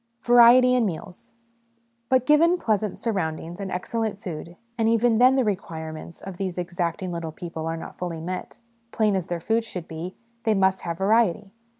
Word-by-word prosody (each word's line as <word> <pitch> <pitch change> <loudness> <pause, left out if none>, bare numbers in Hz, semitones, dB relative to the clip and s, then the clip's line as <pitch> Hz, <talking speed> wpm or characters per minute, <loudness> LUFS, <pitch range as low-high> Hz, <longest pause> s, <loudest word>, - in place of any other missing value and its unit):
Variety 245 +1 +7
in 245 -3 +3
Meals. 180 +1 -8 0.8
But, 260 -1 +3
given 330 +5 +5
pleasant 215 - -1
surround 190 -9 -2
ings 170 +3 -9
and 195 -1 -5
excellent 220 +3 -2
food, 170 -2 -7 0.2
and 225 -1 +1
even 230 0 +3
then 255 +2 +6
the 265 - +3
requirements 165 -6 -5
of 195 -2 -8
these 185 -2 -3
exacting 175 0 -3
little 170 -2 -4
people 165 -1 -6
are 165 0 -2
not - - -9
fully 175 -2 -4
met: 180 +3 -6 0.3
plain 215 -3 +2
as 185 -2 -2
their 175 -1 -3
food 225 +6 0
should 180 -6 -7
be, 165 +3 -6 0.3
they 220 -2 +2
must 190 -1 +2
have 170 -1 -4
variety. 205 0 +2
190 Hz, 180 wpm, -24 LUFS, 170-225 Hz, 0.8 s, Variety